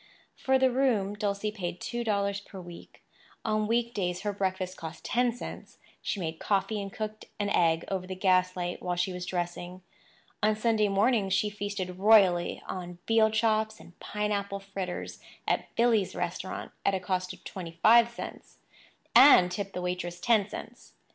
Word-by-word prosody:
For 265 0 +2
the 260 -1 +3
room, 240 -7 +1
Dulcie 205 0 -2
paid 180 -4 -5
two 240 0 -3
dollars 200 -2 0
per 195 -1 -11
week. 175 -1 -12 0.4
On 215 -1 +1
week 235 +1 +1
days 180 -2 -2
her 205 -1 -2
breakfast 185 -2 -2
cost 160 0 -9
ten 245 0 +2
cents; 240 - -9 0.2
she 205 - -2
made 160 -2 -4
coffee 205 +1 0
and 195 0 -6
cooked 215 +1 -5
an 205 0 -1
egg 165 -3 +3
over 185 -2 -3
the 185 - -5
gaslight 185 -1 +1
while 180 -1 -1
she 180 +1 -1
was 180 0 -5
dressing. 175 0 -4 0.6
On 215 0 +3
Sunday 215 -1 +2
mornings 200 -1 +2
she 210 +2 +1
feasted 200 -3 -4
royally 195 -4 +4
on 180 -1 -6
veal 225 -1 +5
chops 220 0 +1
and 175 - -16
pineapple 205 -1 -2
fritters 195 -2 -5 0.3
at - - 0
"Billy's" 230 -5 +2
restaurant, 180 +1 -4
at 200 - +2
a - - -1
cost 185 0 -2
of - - -13
twenty 170 -3 -7
five 235 +1 +7
cents—and 235 -3 +2
tipped 195 0 -4
the 180 - -4
waitress 180 -1 -3
ten 215 0 +2
cents. - - -9
200 Hz, 165 wpm, -29 LUFS, 180-215 Hz, 0.6 s, five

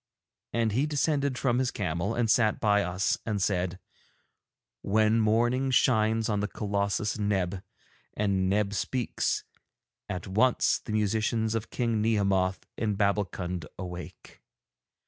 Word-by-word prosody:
And 115 -2 +1
he 130 +8 +1
descended 140 -2 0
from 125 -2 +1
his 130 -1 +1
camel 90 +1 -2
and 120 -1 +1
sat 110 -1 +3
by 105 -1 +3
us 90 +1 0
and 105 -2 -2
said: 90 -2 0 1.0
'When 110 +2 +2
morning 120 +5 +2
shines 110 -3 +3
on 105 -2 0
the 105 - -1
colossus 105 +1 -1
Neb 95 -3 -1 0.5
and 95 -3 +1
Neb 100 0 +1
speaks, 125 +3 -1 0.7
at 90 - -4
once 110 +6 +2
the 110 - -6
musicians 110 +1 0
of 110 0 -3
King 115 -3 0
Nehemoth 100 -4 +1
in 105 -3 0
Babbulkund 95 -4 -1
awake. 90 -2 -9
105 Hz, 125 wpm, -28 LUFS, 95-115 Hz, 1.0 s, sat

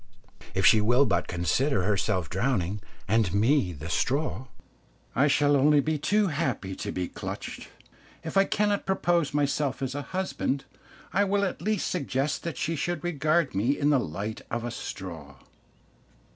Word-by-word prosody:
If - - +2
she 110 - +7
will 120 +6 +4
but 90 -7 0
consider 95 +6 +1
herself 95 -3 0
drowning, 100 - -1 0.3
and 110 -3 +2
me 110 -1 +3
the 80 -1 -8
straw, 130 - -1 0.7
I 140 +4 +4
shall 145 0 +3
only 145 +2 +5
be 155 +1 0
too 205 +6 +2
happy 130 - -2
to - - -4
be 90 -1 -2
clutched. - - -7 0.6
If 160 - -6
I 195 0 +5
cannot 205 0 0
propose 175 -5 +1
myself 140 -2 0
as 135 -1 -3
a 145 - -3
husband, 180 -6 -2 0.5
I 200 +4 +4
will 200 0 +1
at 190 - -4
least 215 0 0
suggest 140 -3 -1
that 170 -6 -5
she 165 - -1
should 165 +1 -2
regard 155 -2 +1
me 115 +9 +1
in 145 +1 +2
the 140 - +4
light 105 +3 -4
of 115 0 -2
a 120 - -3
straw. 80 -10 -7
135 Hz, 160 wpm, -27 LUFS, 105-155 Hz, 0.7 s, she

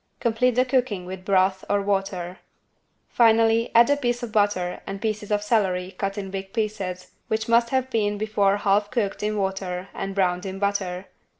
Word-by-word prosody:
Complete 235 +1 +1
the 255 +1 +3
cooking 250 -8 0
with 185 0 -7
broth 190 0 +2
or 205 - +2
water. 195 -3 -2 0.7
Finally 225 0 +3
add 235 +1 +7
a - - +5
piece 245 -3 -2
of 235 - -5
butter 205 -4 0
and 195 - -5
pieces 215 -1 -3
of 205 -1 0
celery 190 -4 0
cut 195 +1 -4
in 195 -2 -5
big 195 0 -6
pieces 200 -5 -3 0.2
which 220 0 -1
must 235 0 +3
have 260 0 -1
been 210 -3 0
before 205 -2 +1
half 205 0 +1
cooked 210 -5 -2
in 210 0 -1
water 190 -1 -3
and 195 0 -5
browned 180 -2 +1
in 190 -1 -5
butter. 195 -2 -2
205 Hz, 180 wpm, -24 LUFS, 190-225 Hz, 0.7 s, add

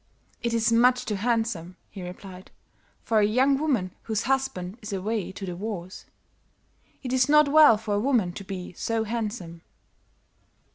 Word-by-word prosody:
"'It 235 - -1
is 230 0 +1
much 245 +2 +4
too 215 - -2
handsome,' 205 -5 -1
he 195 - -9
replied, 180 +1 -10 0.5
'for 225 -2 +2
a - - +4
young 255 +7 +3
woman 250 -12 0
whose 220 -1 -2
husband 245 -7 -2
is 210 0 -7
away 200 +1 -2
to 195 +1 -7
the 180 -2 -5
wars. 185 -2 -6 1.0
It 255 -1 -3
is 260 +2 +3
not 300 0 +6
well 295 -6 +7
for 210 -1 -4
a 205 - +1
woman 220 -7 +1
to 195 - -8
be 185 -2 -7
so 225 +4 -1
handsome.' 210 -7 -4
220 Hz, 160 wpm, -26 LUFS, 185-245 Hz, 1.0 s, well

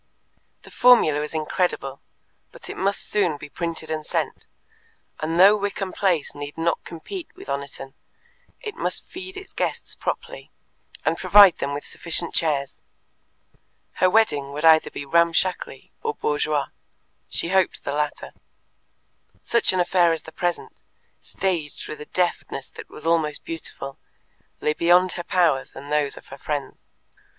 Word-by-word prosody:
The - - -14
formula 235 -12 +5
was 150 +1 -4
incredible, 155 -3 -1 0.5
but - - -9
it - - -7
must 200 +2 -1
soon 180 -8 +1
be 145 +1 -10
printed 165 -1 -4
and 155 -1 -2
sent, - - -3 0.7
and 165 +2 -1
though 200 +3 +8
Wickham 200 -2 -3
Place 180 -7 +1
need 145 +1 -7
not 165 0 0
compete 325 - -7
with - - -12
Oniton, 140 -1 -5 0.7
it 425 -3 -5
must - - -2
feed 375 +1 -9
its 385 - -10
guests - - -2
properly, - - -5 0.6
and - - +1
provide 200 -4 +7
them 140 0 -2
with 145 - -6
sufficient 170 0 0
chairs. 140 -4 -1 1.2
Her 185 - +6
wedding 150 -10 +2
would 150 +3 -2
either 160 -1 +6
be 140 - -7
ramshackly 170 +4 +1
or 450 -2 -2
bourgeois 150 -1 0 0.6
she 170 - -2
hoped 190 -1 +2
the 140 - -3
latter. 150 0 -2 1.1
Such 235 - +2
an 185 - 0
affair 175 -1 +4
as 160 -1 -2
the 160 - -11
present, 175 +1 -3 0.4
staged 170 -6 -3
with 155 - -7
a - - -7
deftness 175 -6 -2
that - - -11
was 150 - -10
almost 160 -3 +1
beautiful, 140 -4 -7 0.6
lay 150 - +2
beyond 175 +3 +4
her 175 - -5
powers 170 -7 +1
and 140 +2 -9
those 150 -2 +1
of - - -13
her 135 - -10
friends. 145 -2 -4
165 Hz, 150 wpm, -24 LUFS, 150-185 Hz, 1.2 s, though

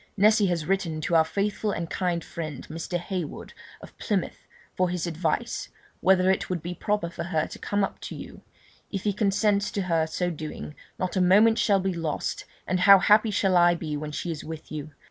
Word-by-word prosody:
Nessy 210 0 +5
has 170 -4 -1
written 180 -4 -1
to 170 - -2
our 165 -1 +6
faithful 205 +5 -1
and 170 -4 -2
kind 175 -1 -1
friend, 155 -5 -6
Mr. 165 +2 -3
Heywood, 175 -3 -5 0.3
of - - -13
Plymouth, - - -2 0.3
for 185 -1 +1
his 180 -1 -2
advice, 165 0 -2 0.3
whether 185 0 +4
it 190 - -1
would 175 -4 -2
be 175 +1 -4
proper 205 0 -1
for 170 0 -6
her 160 -3 0
to - - -10
come 205 0 0
up - - -3
to - - -6
you; - - -10 0.5
if 195 -2 -4
he 205 - +1
consents 200 0 +1
to 200 - -2
her 165 -3 +1
so 175 +2 -1
doing, 155 -1 -7 0.2
not 185 -1 -2
a 185 - +2
moment 210 +5 +5
shall 205 -4 +3
be 190 0 -1
lost, 165 -3 -3 0.2
and 185 - 0
how 195 +2 +9
happy 210 +3 +4
shall 195 -2 +1
I 175 0 +5
be 155 -3 -4
when 150 +1 -5
she 170 +3 -3
is 155 - -6
with 160 -1 -8
you! 155 -1 -5
180 Hz, 205 wpm, -26 LUFS, 165-195 Hz, 0.5 s, how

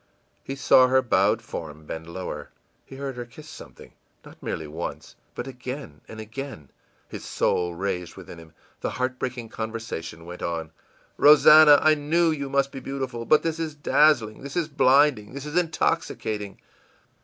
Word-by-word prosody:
î - - -40 0.4
He 135 - -4
saw 130 -1 +5
her 130 +1 +3
bowed 105 0 +2
form 80 -7 -8
bend 80 +2 -7
lower; 95 +1 -6 0.4
he 135 - -11
heard 135 -1 -5
her 120 - -4
kiss 150 +6 -14
something 155 - -13 0.3
not - - -15
merely 80 - -4
once, 80 +3 -7 0.2
but - - -5
again 125 - -8
and 110 - -10
again! 110 - -8 0.4
His - - -8
soul 90 -1 0
raged 90 -1 -3
within 85 - -11
him. 80 -1 -15 0.3
The - - -2
heartbreaking 130 -2 -3
conversation 110 -8 -6
went 90 +1 -9
on: 80 -2 -3 0.5
ìRosannah, 150 0 +8
I 155 - +6
knew 160 +3 +1
you 140 -3 -3
must 140 0 +1
be 135 - -7
beautiful, 130 -3 -5
but 155 - +4
this 165 0 -2
is 160 -2 -3
dazzling, 145 -7 +2
this 140 0 -8
is 170 -3 0
blinding, 135 -5 +3
this 140 0 -6
is 150 +1 -6
intoxicating! 110 - -1
130 Hz, 165 wpm, -25 LUFS, 95-145 Hz, 0.5 s, ìRosannah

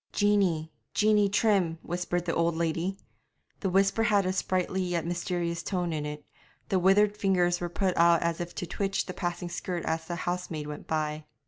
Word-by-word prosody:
'Jeanie, 190 -7 +2 0.2
Jeanie 210 -1 +4
Trim,' 195 -5 +2
whispered 175 0 -2
the 165 - 0
old 170 0 +1
lady. 170 +3 -1 0.6
The 195 - -1
whisper 195 +4 +3
had 205 -3 +3
a 185 - 0
sprightly 185 0 0
yet 175 -2 -1
mysterious 170 0 -2
tone 180 -3 -2
in 150 -1 -2
it; 150 0 -7 0.4
the 190 - +2
withered 200 +3 +4
fingers 180 -3 +2
were 175 - -2
put 185 +1 0
out 170 0 +5
as 170 0 -1
if 175 0 -6
to - - -3
twitch 195 +3 -1
the 185 - -6
passing 175 -1 -3
skirt 175 0 -4
as 160 0 -1
the 175 - -3
housemaid 175 -4 -3
went 150 0 -7
by. 155 -1 -2
175 Hz, 185 wpm, -28 LUFS, 170-195 Hz, 0.6 s, out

